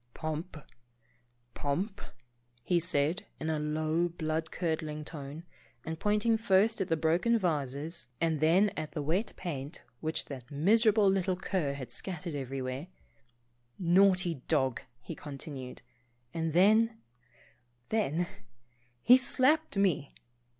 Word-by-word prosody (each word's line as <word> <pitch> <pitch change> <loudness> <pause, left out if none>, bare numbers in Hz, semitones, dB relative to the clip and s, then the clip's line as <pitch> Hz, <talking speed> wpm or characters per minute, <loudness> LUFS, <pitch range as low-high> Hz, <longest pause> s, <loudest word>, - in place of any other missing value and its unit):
"Pomp, 155 +2 -4 1.0
Pomp," 185 +9 -2 0.6
he 175 +8 +2
said, 165 +1 0
in 160 - -2
a 155 - -1
low 155 +3 0
blood 160 -1 -2
cur 165 -3 -1
dling 150 -1 -6
tone, 150 0 -7 0.4
and 160 0 -4
pointing 210 +2 +2
first 215 0 +3
at 190 - 0
the 165 - +1
broken 170 +9 +2
vases 155 - -2
and 165 -2 +1
then 175 +7 +4
at 155 - -5
the 155 - -2
wet 180 +10 0
paint 145 -3 -6 0.2
which 160 0 -2
that 130 -4 -9
miserable 210 +7 +4
little 190 -1 +2
cur 180 -6 -1
had 135 -3 -7
scattered 175 -3 -5
everywhere, 135 +1 -4 0.5
" 120 0 -42 0.2
naughty 185 -7 +3
dog," 130 -6 +1 0.2
he - - -7
continued, 140 -3 -8 0.5
and 165 -2 -2
then 220 +6 +4 0.5
— 120 0 -35
then 175 -6 +1 0.4
— 120 0 -39
he 245 - +9
slapped 260 +2 +2
me! 180 -8 +2
160 Hz, 130 wpm, -31 LUFS, 145-190 Hz, 1.0 s, he